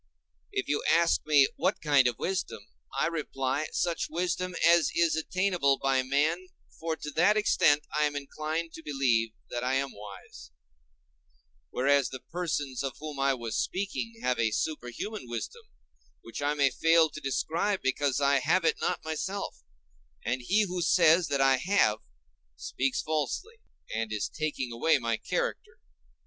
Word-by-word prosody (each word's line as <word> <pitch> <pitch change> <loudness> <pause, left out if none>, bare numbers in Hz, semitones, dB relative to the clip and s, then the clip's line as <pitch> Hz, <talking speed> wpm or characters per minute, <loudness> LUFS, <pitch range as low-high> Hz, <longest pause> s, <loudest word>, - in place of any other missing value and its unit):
If 130 - -2
you 145 - 0
ask 170 0 +3
me 145 -3 +6
what - - 0
kind 145 -4 +4
of 120 -3 -1
wisdom, 190 0 -3 0.3
I - - +3
reply, 150 -3 -2
such 170 -2 -1
wisdom 180 +2 -2
as 170 -1 +5
is 170 -2 +3
attainable 175 -4 +1
by 135 -1 +1
man, 150 +7 0 0.3
for 165 -1 -2
to 150 - -7
that 180 +8 +3
extent 150 -8 +3
I 150 0 +3
am 145 0 -2
inclined 155 +3 -4
to - - -9
believe 125 -7 +1 0.2
that 120 0 -3
I 130 +1 +1
am 135 +1 0
wise; 100 -9 -11 1.2
whereas 140 - +2
the 130 - -7
persons 150 -5 -3
of 135 -3 -4
whom 150 -2 -7
I 135 0 +2
was 115 -2 -5
speaking 200 +4 -3
have 125 0 0
a 115 -1 +3
superhuman 150 - -4
wisdom, 120 - -5 0.6
which - - -8
I 145 +1 0
may 140 -2 +3
fail 165 +3 +4
to 155 - -8
describe, 165 +8 -1
because 135 +1 +1
I 140 -1 +3
have 165 +6 +1
it - - +1
not - - -1
myself; 190 +6 -4 0.6
and 125 +2 -1
he 200 - +2
who 180 -2 -3
says 170 0 +4
that 140 -1 0
I 135 -1 +5
have, 130 - +2 0.6
speaks 130 - -2
falsely, 160 - -3 0.3
and 110 0 -2
is 105 -1 -1
taking 150 -5 -3
away 140 +7 +3
my 115 -3 -1
character. - - -3
150 Hz, 160 wpm, -29 LUFS, 130-170 Hz, 1.2 s, me